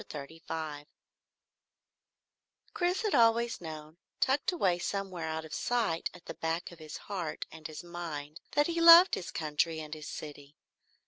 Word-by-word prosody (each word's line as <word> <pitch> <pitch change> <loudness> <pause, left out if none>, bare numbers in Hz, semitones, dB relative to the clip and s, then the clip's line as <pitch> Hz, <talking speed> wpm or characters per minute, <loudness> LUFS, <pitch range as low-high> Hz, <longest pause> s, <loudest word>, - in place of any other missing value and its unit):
CHAPTER - - -8
35 155 0 -6 1.9
Chris 360 +4 0
had 425 - 0
always 230 -1 +3
known, 155 -1 -8 0.2
tucked 275 +6 +2
away 190 - +1
somewhere 185 -3 -3
out 160 0 -3
of 160 - -10
sight 225 -9 0
at 180 - -15
the - - -6
back 165 +2 -3
of 170 - -13
his 155 -1 -8
heart 180 -6 -4
and 160 -1 -8
his 155 +1 -8
mind, 165 -3 -6
that 295 - +4
he 335 +1 -1
loved 335 +3 +10
his 175 - -2
country 160 +1 -1
and 155 -1 -7
his 155 -1 -7
city. 145 -1 -8
165 Hz, 155 wpm, -31 LUFS, 155-225 Hz, 1.9 s, loved